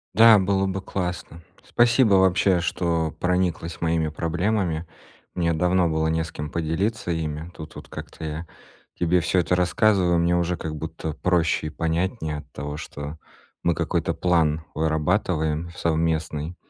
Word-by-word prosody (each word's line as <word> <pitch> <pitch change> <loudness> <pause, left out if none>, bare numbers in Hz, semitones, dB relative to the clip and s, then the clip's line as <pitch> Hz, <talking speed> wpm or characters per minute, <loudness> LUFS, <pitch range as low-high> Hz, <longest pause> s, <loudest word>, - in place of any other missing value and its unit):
Да, 110 0 +8
было 95 0 +1
бы 95 0 -3
классно. 90 -3 -4 0.2
Спасибо, 120 -3 +4
вообще, 95 -1 +4
что 85 -2 0
прониклась 90 -2 -1
моими 80 -1 +1
проблемами. 85 +1 -1 0.5
Мне 85 -2 +1
давно 90 +2 +2
было 80 0 0
не 80 0 0
с 80 - -9
кем 75 0 -5
поделиться 85 +5 -1
ими. 80 0 -3
Тут 80 -1 -9
вот - - -10
как-то - - -8
я 80 +2 -5 0.5
тебе 90 +1 +3
всё 90 +2 +1
это 90 +1 +1
рассказываю, 90 -1 +3
мне 85 +1 +2
уже, 85 0 0
как 80 -1 -5
будто, 80 0 -5
проще 85 -2 +1
и - - -3
понятнее 80 +1 -2
от 75 0 -15
того, 75 +1 -5
что 75 0 -7 0.5
мы 85 - +3
какой-то 85 0 -1
план 80 -2 +1
вырабатываем 80 0 0
совместный. 80 0 -1
85 Hz, 145 wpm, -24 LUFS, 80-90 Hz, 0.5 s, Да